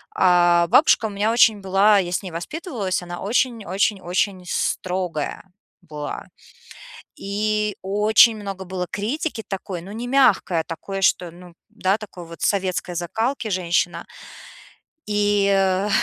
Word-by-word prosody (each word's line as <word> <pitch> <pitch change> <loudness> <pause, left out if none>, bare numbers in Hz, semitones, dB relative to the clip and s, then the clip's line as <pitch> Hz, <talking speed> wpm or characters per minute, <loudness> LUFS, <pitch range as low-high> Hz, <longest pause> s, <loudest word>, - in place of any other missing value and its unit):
А 175 -1 +4
бабушка 225 - +5
у - - -6
меня 205 +2 0
очень 220 -3 +4
была 195 +2 +4
я 175 -2 -2
с 180 - -2
ней 185 - -7
воспитывалась, 200 - -4
она 175 0 -7
очень 230 +1 0
очень 195 +2 0
очень 180 +1 -1
строгая 180 -4 -2 0.4
была. 150 -4 -7 0.9
И 210 +1 -1
очень 210 +4 +4
много 195 -2 -6
было 180 -1 -4
критики 225 +3 -3
такой, 190 -3 -5
ну 195 +3 -10
не 235 +3 -5
мягкой, 245 -10 +3
а - - -8
такой, 195 +4 -6
что, 175 -2 +2
ну 175 0 -14 0.2
да, 190 +2 0
такой 195 -5 -10
вот 165 0 -12
советской 185 -2 -1
закалки 220 +7 -2
женщина. 175 -2 -1 1.0
И, 205 -1 +2
э, 195 +1 +2
195 Hz, 140 wpm, -22 LUFS, 180-210 Hz, 1.0 s, бабушка